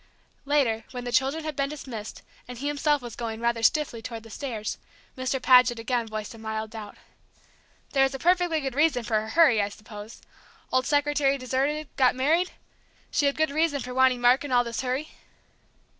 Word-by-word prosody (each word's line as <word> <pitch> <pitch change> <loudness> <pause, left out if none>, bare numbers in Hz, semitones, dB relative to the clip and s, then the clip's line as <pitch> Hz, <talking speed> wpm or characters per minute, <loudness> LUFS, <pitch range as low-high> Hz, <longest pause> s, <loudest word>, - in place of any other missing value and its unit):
Later, 270 -6 +1
when 250 -1 -6
the 245 - -4
children 270 +6 +1
had 310 -2 -4
been 275 0 0
dismissed, 245 -8 -7 0.2
and 250 -1 -8
he 270 - -6
himself 290 -1 +1
was 240 -2 -7
going, 225 -2 -4
rather 235 0 0
stiffly, 240 -1 +1
toward 225 -1 -7
the 225 - -13
stairs, 225 -6 -4 0.4
Mr. 260 0 -1
Paget 250 -2 +5
again 230 0 -1
voiced 215 0 -5
a 225 - -13
mild 220 0 -4
doubt. 215 -2 -9 0.9
"There 270 - +2
was 270 0 +3
a - - -3
perfectly 350 0 +2
good 270 -2 -3
reason 285 -3 +2
for 220 -2 0
her 220 - -7
hurry, 280 -7 +5
I 200 - -1
suppose? 210 +1 -11 0.5
Old 255 0 +2
secretary 290 -1 +2
deserted 275 +4 -1
got 255 -2 +4
married? 320 +8 +2 0.6
She 285 - +2
had 280 - 0
good 315 -1 +1
reason 310 -1 +1
for 250 +1 -6
wanting 260 -1 +3
Mark 245 +3 +4
in 290 - -6
all 245 -1 +4
this 235 -1 -4
hurry?" 260 +4 -2
255 Hz, 190 wpm, -26 LUFS, 230-290 Hz, 0.9 s, Paget